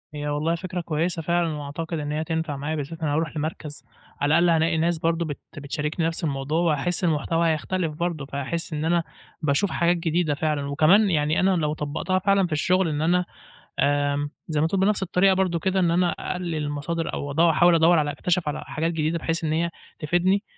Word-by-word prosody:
هي 145 0 -4
والله 150 +3 0
فكرة 180 0 -4
كويسة 165 +1 -1
فعلًا 170 0 0
وأعتقد 155 +3 -5
إن 145 0 -4
هي 150 +1 -1
هتنفع 160 -2 -2
معايا، 145 +3 -3
بالذات 155 +3 -6
أنا 150 -2 0
هارُوح 160 +1 -1
لمركز 150 -1 -5 0.4
على 145 +2 +4
الأقل 175 0 +4
هالاقي 165 0 +2
ناس 170 +1 +1
برضه 165 +1 0
بت 145 -3 -5 0.2
بتشاركني 150 +3 -2
نَفْس 165 +1 -3
الموضوع 145 +2 -1
وهاحس 170 +2 0
المحتوى 165 0 +1
هيختلف 165 +1 -1
برضه، 165 -2 -3
فهاحس 140 +5 -4
إن 155 +1 -2
أنا 170 0 +2 0.4
باشوف 155 +5 +1
حاجات 175 +1 +2
جديدة 165 -1 0
فعلًا، 150 -2 -1
وكمان 175 +9 +4
يعني 150 -2 +1
أنا 190 - +3
لو 150 -3 0
طبّقتها 155 +5 -1
فعلًا 195 -1 +2
في - - -16
الشغل 180 +4 +2
إن 150 -1 -2
أنا 175 +3 +2 0.6
آمم 145 0 +1 0.2
زي 155 -2 0
ما 155 - +3
تقول 185 +4 0
بنَفْس 200 +1 +2
الطريقة 190 +1 +3
برضه 185 -3 +1
كده 190 +3 0
إن 175 -2 +3
أنا 175 +1 +2
أقلل 180 -2 -3
المصادر 150 +2 -3
أو 145 - -4
ادوّ 165 +4 +4
احاول 170 +2 +5
ادوّر 165 +1 +5
على 145 -1 +1
أكتشف 170 +3 -1
على 150 - -3
حاجات 165 +1 -2
جديدة 160 +1 -1
بحيث 165 +1 -2
إن 155 - 0
هي 170 +2 0 0.3
تفيدني. 175 +6 +1
165 Hz, 200 wpm, -24 LUFS, 150-175 Hz, 0.6 s, احاول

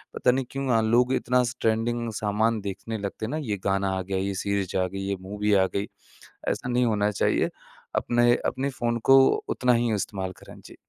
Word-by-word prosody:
पता 125 - +3
नहीं 130 +1 -1
क्यों 135 0 -3
अ, - - +3
लोग 120 +3 +3
इतना 125 +1 +2
स 120 +1 -3
ट्रेंडिंग 115 +1 0
सामान 110 +2 0
देखने 100 +3 -5
लगते 100 +1 -4
हैं - - -5
ना 155 - -2
ये 100 - 0
गाना 95 0 +1
आ - - -2
गया, 95 +1 -3
ये 100 +1 -1
सीरीज़ 100 -2 -1
आ 95 0 +1
गई, 95 +1 -6
ये 100 - 0
मूवी 105 +2 -1
आ 95 -1 +4
गई 100 +1 -1 0.6
ऐसा 125 - -3
नहीं 125 0 +2
होना 105 -2 +1
चाहिए। 100 - +1 0.5
अपने, 120 0 +3
अपने 135 +2 -1
फ़ोन 120 -3 -1
को 135 - +9 0.3
उतना 125 -1 +2
ही 115 -1 +1
इस्तेमाल 95 -2 -3
करें। - - -13
जी। - - -12
110 Hz, 210 wpm, -26 LUFS, 100-120 Hz, 0.6 s, को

